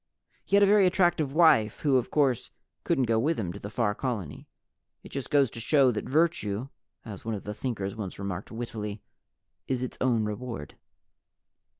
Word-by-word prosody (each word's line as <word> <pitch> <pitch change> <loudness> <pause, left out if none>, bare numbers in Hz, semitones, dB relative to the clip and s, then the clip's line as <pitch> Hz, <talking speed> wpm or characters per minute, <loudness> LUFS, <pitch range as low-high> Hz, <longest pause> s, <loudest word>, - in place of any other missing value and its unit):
He - - +1
had 200 - +6
a - - +8
very 200 -1 +5
attractive 175 -6 +2
wife, 145 -10 +4
who 140 -3 +3
of 125 - -1
course 135 -5 +1 0.3
couldn't 135 - +1
go 115 -1 +2
with 155 +5 0
him 90 -5 -3
to - - -8
the 100 - -7
Far 110 -2 0
Colony. 105 - -4 0.6
It - - -11
just 135 -2 -5
goes 140 -5 +3
to - - -8
show 135 +2 +4
that 110 - -4
virtue 135 -7 +1 0.4
(as 105 -4 -8
one 115 -1 -2
of 100 - -7
the 105 - -5
Thinkers 105 -5 -4
once 100 -4 -6
remarked 100 -1 -5
wittily) 110 -3 -5 0.6
is 130 -1 -1
its 125 - -6
own 120 -4 +2
reward. 105 - -5
120 Hz, 185 wpm, -28 LUFS, 105-140 Hz, 0.6 s, a